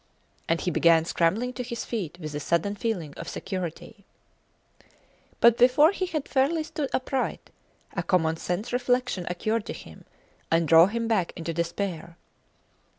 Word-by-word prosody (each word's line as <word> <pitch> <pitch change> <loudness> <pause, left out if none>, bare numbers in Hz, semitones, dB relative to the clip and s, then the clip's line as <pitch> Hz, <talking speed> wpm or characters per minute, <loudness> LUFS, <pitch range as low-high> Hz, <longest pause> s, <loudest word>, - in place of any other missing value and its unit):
And 165 0 +1
he 180 - -1
began 165 0 +4
scrambling 195 +10 0
to 250 - -5
his 235 -1 -5
feet 180 -8 -4
with 155 -3 -6
a 145 - -3
sudden 170 +6 0
feeling 185 -10 -3
of - - -6
security. 185 +1 -6 1.4
But 235 0 +5
before 265 +7 +6
he 375 -2 -2
had 310 -5 -3
fairly 290 +4 +1
stood 310 -3 -4
upright, 260 0 -2 0.4
a - - -1
commonsense 175 +4 -1
reflection 245 -6 0
occurred 215 +5 -1
to - - -4
him - - -12 0.4
and 165 0 +2
drove 165 +3 +7
him 230 +1 -2
back 205 -7 0
into 165 -1 -4
despair. 170 0 -3
200 Hz, 150 wpm, -26 LUFS, 170-250 Hz, 1.4 s, drove